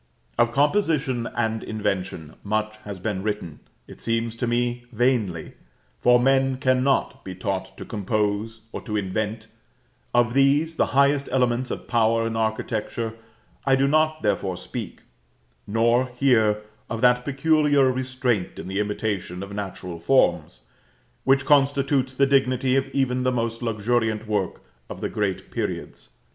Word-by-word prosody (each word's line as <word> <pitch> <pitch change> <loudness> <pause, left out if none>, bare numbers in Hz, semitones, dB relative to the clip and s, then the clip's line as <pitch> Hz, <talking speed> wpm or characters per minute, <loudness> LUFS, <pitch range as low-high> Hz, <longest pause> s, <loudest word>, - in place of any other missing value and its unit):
Of 120 - +3
composition 145 - +1
and 110 -1 -1
invention 95 -7 -3
much 110 +1 -1
has 100 -2 -6
been 95 0 -3
written, 105 -7 -4 0.3
it - - -13
seems 115 0 -1
to 120 - -1
me 120 0 -1
vainly, 115 -8 0 0.5
for 125 - +5
men 135 +1 +3
cannot 130 +1 +1
be 95 - -7
taught 95 0 -4
to - - -7
compose 105 +1 -2
or - - -6
to 105 -2 -3
invent; 105 +2 -2 0.7
of 120 -1 +3
these, 145 +4 +3
the - - +3
highest 140 0 +3
elements 125 -1 +1
of - - -5
Power 115 -1 +2
in 115 0 -2
architecture, 110 0 -2 0.5
I 135 -1 +4
do 135 +1 +2
not, 155 0 +2
therefore, 95 -3 0
speak; 100 +3 -7 0.7
nor, 115 +4 +2
here, 110 -5 +3 0.3
of 115 -1 -3
that 125 0 +4
peculiar 145 -1 +3
restraint 130 -5 -1
in - - -7
the 95 +1 -2
imitation 105 -3 -2
of 100 0 -8
natural 95 -4 -6
forms, 85 - +2 0.6
which 135 0 +3
constitutes 140 -2 +2
the 140 - +4
dignity 130 -1 +2
of 135 0 +1
even 130 -2 0
the 130 0 +1
most 115 -1 -2
luxuriant 110 -1 0
work 105 -4 -2 0.3
of - - -7
the - - -2
great 100 -3 -2
periods. - - -4
115 Hz, 145 wpm, -24 LUFS, 105-130 Hz, 0.7 s, for